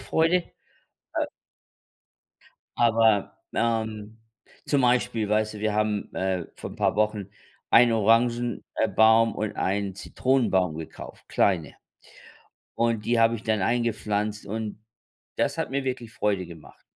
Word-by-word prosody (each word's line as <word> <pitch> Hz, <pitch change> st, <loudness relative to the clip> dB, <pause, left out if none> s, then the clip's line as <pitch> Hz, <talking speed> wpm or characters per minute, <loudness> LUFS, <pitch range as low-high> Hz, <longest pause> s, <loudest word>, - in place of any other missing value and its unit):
Freude, 165 Hz, +2 st, +2 dB, 0.8 s
äh -, -, +1 dB, 1.5 s
aber, 115 Hz, -3 st, +3 dB, 0.2 s
ähm, 110 Hz, -2 st, -2 dB, 0.5 s
zum 140 Hz, -2 st, +2 dB
Beispiel, 120 Hz, -3 st, +1 dB
weißt 110 Hz, +1 st, 0 dB
du, 105 Hz, -, -8 dB
wir 110 Hz, 0 st, 0 dB
haben, 105 Hz, -1 st, -1 dB
äh, 95 Hz, -2 st, -1 dB
vor -, -, -7 dB
'n -, -, -11 dB
paar -, -, +1 dB
Wochen 105 Hz, -2 st, 0 dB, 0.4 s
einen 120 Hz, 0 st, +7 dB
Orangen 115 Hz, +2 st, +2 dB
äh, 110 Hz, -, +2 dB
baum 110 Hz, +1 st, +4 dB
und 110 Hz, -1 st, -3 dB
einen 100 Hz, 0 st, -1 dB
Zitronenbaum 100 Hz, -8 st, +1 dB
gekauft, 80 Hz, 0 st, -10 dB
kleine. 85 Hz, -7 st, +1 dB, 1.0 s
Und 115 Hz, -2 st, 0 dB
die 120 Hz, +1 st, +2 dB
habe 115 Hz, +1 st, +4 dB
ich 110 Hz, -, -6 dB
dann 110 Hz, -2 st, 0 dB
eingepflanzt 105 Hz, -2 st, -1 dB
und 110 Hz, 0 st, -5 dB, 0.5 s
das -, -, 0 dB
hat -, -, -2 dB
mir 140 Hz, 0 st, -1 dB
wirklich 125 Hz, -3 st, -4 dB
Freude 100 Hz, -5 st, 0 dB
gemacht. 80 Hz, -4 st, -14 dB
110 Hz, 130 wpm, -26 LUFS, 105-115 Hz, 1.5 s, einen